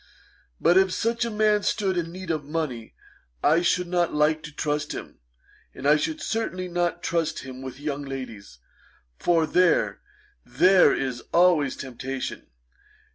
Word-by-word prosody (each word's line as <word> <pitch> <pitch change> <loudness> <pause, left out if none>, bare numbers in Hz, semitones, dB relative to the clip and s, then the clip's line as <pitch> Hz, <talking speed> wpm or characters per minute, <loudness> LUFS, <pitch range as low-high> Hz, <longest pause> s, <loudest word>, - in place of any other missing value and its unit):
But 175 +2 +5
if 190 -1 +2
such 230 +4 0
a - - -2
man 210 -1 +2
stood 195 -2 0
in 170 -1 -2
need 185 -1 -5
of 155 -2 -2
money, 140 -7 -4 0.5
I 165 +3 +4
should 180 +1 +1
not 175 -1 0
like 155 +1 +2
to 150 - -9
trust 150 0 -2
him; - - -9 0.6
and 135 - -3
I 150 - +6
should 310 - -2
certainly 205 - -2
not 175 -1 -1
trust 165 -2 -1
him 130 0 -9
with 130 0 -8
young 145 -1 -3
ladies, 125 - -8 0.6
for 165 -2 +2
there 180 +2 +2 0.4
there 185 -5 +5
is 130 -3 -2
always 170 -6 +4
temptation. 130 0 -6
165 Hz, 150 wpm, -25 LUFS, 140-180 Hz, 0.6 s, I